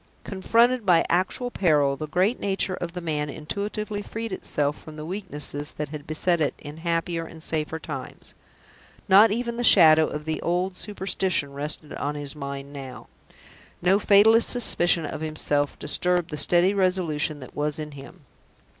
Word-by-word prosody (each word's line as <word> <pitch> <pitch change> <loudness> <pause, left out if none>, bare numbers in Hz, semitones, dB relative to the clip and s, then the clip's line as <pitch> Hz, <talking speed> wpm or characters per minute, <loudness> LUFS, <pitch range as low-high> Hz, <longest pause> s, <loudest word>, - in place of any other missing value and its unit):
Confronted 230 +5 +2
by 175 -4 +4
actual 190 +8 0
peril, 145 -9 +2
the 155 +3 -6
great 185 - +1
nature 195 -1 0
of 175 -2 -5
the 180 - -5
man 150 -3 -2
intuitively 205 +7 -4
freed 225 +1 -6
itself 145 -4 -1
from 155 - -11
the 155 0 -7
weaknesses 150 -6 -3
that 150 -1 -5
had 150 -1 -8
beset 165 +2 +1
it 145 - 0
in 145 +1 -10
happier 165 0 -2
and 160 -1 -10
safer 160 -1 -2
times. 150 -4 -8 0.7
Not 200 +4 +7
even 235 +1 -2
the 240 - -2
shadow 160 -7 +7
of 150 0 -6
the 160 0 -3
old 180 +2 -1
superstition 190 -7 -2
rested 150 +1 -4
on 145 +1 -3
his 145 0 -6
mind 140 -1 -7
now 135 -3 -9 0.7
no 190 +3 +3
fatalist 220 +3 +5
suspicion 175 -8 +2
of 150 - -6
himself 150 -2 -1
disturbed 180 -1 +1
the - - -3
steady 175 +5 +4
resolution 175 -6 0
that 130 - -12
was 150 0 -2
in 155 -1 -6
him. 140 -1 -12
165 Hz, 165 wpm, -24 LUFS, 150-190 Hz, 0.7 s, Not